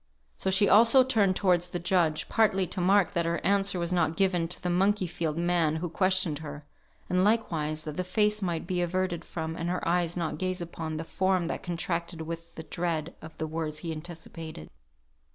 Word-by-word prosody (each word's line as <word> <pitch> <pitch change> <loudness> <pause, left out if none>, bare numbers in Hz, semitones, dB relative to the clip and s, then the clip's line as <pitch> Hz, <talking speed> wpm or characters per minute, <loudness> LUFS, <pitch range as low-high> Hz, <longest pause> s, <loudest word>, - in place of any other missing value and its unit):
So 190 - -2
she 190 +2 +4
also 230 +6 +7
turned 210 -7 +2
towards 180 -2 +2
the 175 - -3
judge, 175 -3 +1
partly 195 -4 +2
to 180 - -4
mark 195 +1 +4
that 170 -3 0
her 170 0 0
answer 200 -1 +3
was 170 +1 -1
not 165 -2 +1
given 180 -4 +2
to 175 - -2
the - - -4
monkeyfied 175 -4 0
man 170 -2 +2
who 170 +2 -3
questioned 185 -4 +1
her, 150 -1 -8 0.4
and 180 0 +2
likewise 160 -8 0
that 150 -2 -6
her - - +1
face 210 +3 +1
might 175 -4 -2
be 180 0 -1
averted 175 -1 -1
from, 160 -1 -5
and 170 +1 -3
her 180 -1 -2
eyes 175 0 +1
not 170 -2 -2
gaze 185 0 -1
upon, 165 -2 -5
the 160 - -3
form 185 0 0
that - - -3
contracted 170 -1 -3
with 165 +1 -7
the 160 - -7
dread 170 -1 -3
of 160 0 -11
the 160 - -2
words 155 -1 -3
he 165 - -2
anticipated. 160 - -8
175 Hz, 195 wpm, -28 LUFS, 165-185 Hz, 0.4 s, also